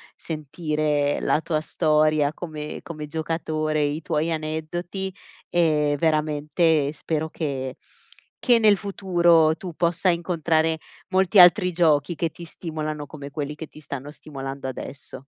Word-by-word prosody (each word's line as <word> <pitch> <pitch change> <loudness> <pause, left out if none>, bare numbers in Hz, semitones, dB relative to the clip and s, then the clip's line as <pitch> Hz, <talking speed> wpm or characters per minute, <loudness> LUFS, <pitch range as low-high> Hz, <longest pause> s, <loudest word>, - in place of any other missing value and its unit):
sentire 150 -2 -1
la 155 - +2
tua 160 -2 -1
storia 155 -2 +2
come 155 -3 -6
come 155 -3 -7
giocatore, 155 -1 -1
i 145 +2 -1
tuoi 160 +1 -1
aneddoti 165 +5 -3 0.4
e 150 -4 +2
veramente 155 -1 +2
spero 160 0 -3
che 135 -5 -4 0.6
che 240 -2 +4
nel 210 -2 +5
futuro 175 -5 +3
tu 175 +1 -7
possa 175 +3 +1
incontrare 165 -2 +1 0.3
molti 190 +1 +4
altri 180 +1 +7
giochi 160 -2 +2
che 165 0 -1
ti 170 +2 -11
stimolano, 155 -2 -5
come 140 -1 -9
quelli 145 0 -4
che 155 0 -7
ti 155 - -15
stanno 140 -1 -7
stimolando 135 -3 -7
adesso. 130 0 -8
155 Hz, 130 wpm, -24 LUFS, 150-170 Hz, 0.6 s, altri